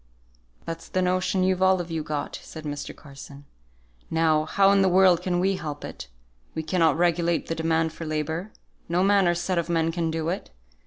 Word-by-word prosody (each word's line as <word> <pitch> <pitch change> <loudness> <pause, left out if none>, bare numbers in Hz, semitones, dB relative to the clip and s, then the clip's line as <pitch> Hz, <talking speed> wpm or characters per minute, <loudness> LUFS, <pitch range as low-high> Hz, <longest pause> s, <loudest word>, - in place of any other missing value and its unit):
"That's 165 0 -6
the 185 - 0
notion 185 +1 +1
you've 185 0 +1
all 190 0 +4
of 175 -1 -5
you 160 -1 -2
got," 150 -1 -4
said 160 - -10
Mr. 145 -1 -5
Carson. 140 0 -12 0.6
"Now, 160 -1 +2
how 195 +4 +4
in 200 -1 +4
the 190 - +4
world 185 -1 +5
can 180 -1 0
we 190 +1 +1
help 150 -4 -6
it? - - -8 0.5
We 160 - -2
cannot 160 -2 +2
regulate 170 -1 +1
the - - 0
demand 160 0 0
for 165 - -8
labour. 160 +6 -3 0.4
No 175 +2 +2
man 200 -1 +4
or 175 - +2
set 175 +1 -1
of 170 - -3
men 165 -1 +1
can 165 -1 -1
do 160 0 -2
it. 185 - -4
170 Hz, 200 wpm, -25 LUFS, 160-185 Hz, 0.6 s, world